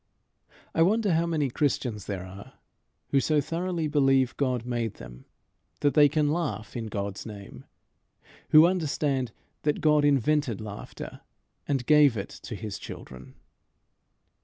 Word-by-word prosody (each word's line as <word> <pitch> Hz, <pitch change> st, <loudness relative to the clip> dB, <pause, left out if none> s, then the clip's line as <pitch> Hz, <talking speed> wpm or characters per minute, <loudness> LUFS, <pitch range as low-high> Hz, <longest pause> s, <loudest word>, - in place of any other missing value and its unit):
I 165 Hz, -, +1 dB
wonder 205 Hz, +2 st, +3 dB
how 165 Hz, +1 st, +2 dB
many 150 Hz, -6 st, 0 dB
Christians 125 Hz, -7 st, -1 dB
there 95 Hz, -3 st, -4 dB
are 95 Hz, +2 st, -11 dB, 0.6 s
who 140 Hz, -, +3 dB
so 150 Hz, +2 st, +2 dB
thoroughly 165 Hz, +2 st, -2 dB
believe 135 Hz, -4 st, +3 dB
God 125 Hz, -4 st, -1 dB
made 120 Hz, -3 st, -2 dB
them -, -, -12 dB, 0.6 s
that 145 Hz, -, +3 dB
they 145 Hz, -2 st, +6 dB
can 150 Hz, 0 st, +1 dB
laugh 145 Hz, -, -3 dB
in 115 Hz, -2 st, -4 dB
God's 100 Hz, -2 st, -4 dB
name; 100 Hz, -, -10 dB, 0.8 s
who 155 Hz, +1 st, +8 dB
understand 145 Hz, -8 st, 0 dB, 0.3 s
that 150 Hz, -1 st, 0 dB
God 150 Hz, -1 st, +3 dB
invented 145 Hz, -3 st, +2 dB
laughter 105 Hz, -1 st, -8 dB, 0.5 s
and 135 Hz, -4 st, -1 dB
gave 150 Hz, -5 st, +5 dB
it 100 Hz, -, -4 dB
to 110 Hz, -, -8 dB
his 105 Hz, -1 st, -6 dB
children. 65 Hz, -1 st, -10 dB
135 Hz, 135 wpm, -27 LUFS, 110-155 Hz, 0.8 s, who